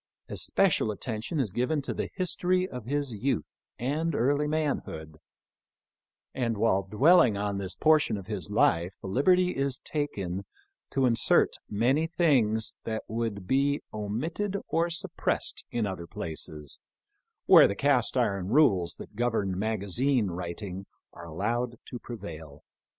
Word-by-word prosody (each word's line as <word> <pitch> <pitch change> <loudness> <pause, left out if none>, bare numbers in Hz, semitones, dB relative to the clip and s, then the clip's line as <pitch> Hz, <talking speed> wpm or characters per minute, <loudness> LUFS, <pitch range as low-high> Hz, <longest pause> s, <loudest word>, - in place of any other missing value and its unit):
Especial 190 - +2
attention 110 - -3
is 110 -9 -1
given 125 +7 0
to - - -3
the - - -3
history 185 0 +1
of 125 - -8
his 140 +1 -1
youth 110 - -2 0.2
and 150 +6 -1
early 145 +5 +2
manhood; 140 - -3 1.2
and 115 -4 -1
while 100 -2 +2
dwelling 110 - +4
on 100 -1 -2
this 95 -1 -4
portion 155 -8 +3
of 100 - -8
his 95 -6 -5
life 85 +3 +2
the - - -7
liberty 180 - +3
is 135 -1 -1
taken 100 - -3 0.5
to 135 -1 +1
insert 115 -3 +4 0.2
many 130 +10 +2
things 130 -11 +2
that 110 -1 -3
would 110 -3 -3
be 140 +5 +2
omitted 155 - -3
or 165 +1 +1
suppressed 170 - -2
in 120 -2 -1
other 95 -4 -5
places, 75 -3 -6 0.7
where - - +8
the 100 - -3
cast 140 0 +2
iron 100 -7 0
rules 100 - +3
that - - -11
govern 110 -5 0
magazine 110 +3 0
writing 90 +2 -6 0.3
are 85 0 -10
allowed 115 +9 -2
to 125 - -7
prevail. 80 - -9
115 Hz, 135 wpm, -28 LUFS, 100-145 Hz, 1.2 s, where